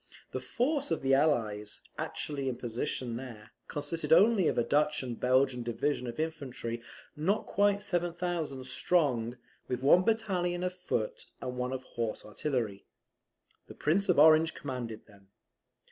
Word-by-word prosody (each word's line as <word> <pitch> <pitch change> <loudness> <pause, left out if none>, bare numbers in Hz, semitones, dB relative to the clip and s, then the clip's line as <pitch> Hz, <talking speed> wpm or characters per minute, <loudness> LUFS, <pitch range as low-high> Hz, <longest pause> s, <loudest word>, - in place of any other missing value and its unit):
The - - -2
force 280 +4 0
of 165 -4 -1
the 135 0 +3
Allies, 115 -8 +1
actually 140 -3 -3
in 125 - -2
position 120 0 -3
there, 120 -4 -9 0.2
consisted 145 +3 -3
only 195 +1 +6
of - - 0
a 120 - +4
Dutch 150 +2 +2
and 120 -3 -5
Belgian 130 0 +3
division 125 +3 -1
of 120 +3 -6
infantry, 135 -7 -3 0.3
not 185 +8 0
quite 205 0 +2
7,000 175 -7 -2
strong, 130 -5 +1 0.3
with 125 0 -3
one 160 +6 +7
battalion 185 -5 0
of 180 0 -1
foot, 180 -12 -3
and 125 -1 -4
one 125 0 -2
of 130 -1 -4
horse 115 -3 -4
artillery. 110 -3 -2 0.8
The - - -11
Prince 185 +7 +1
of 180 - +4
Orange 155 +2 +6
commanded 120 -5 -5
them. 100 -2 -20
140 Hz, 145 wpm, -31 LUFS, 120-175 Hz, 0.8 s, one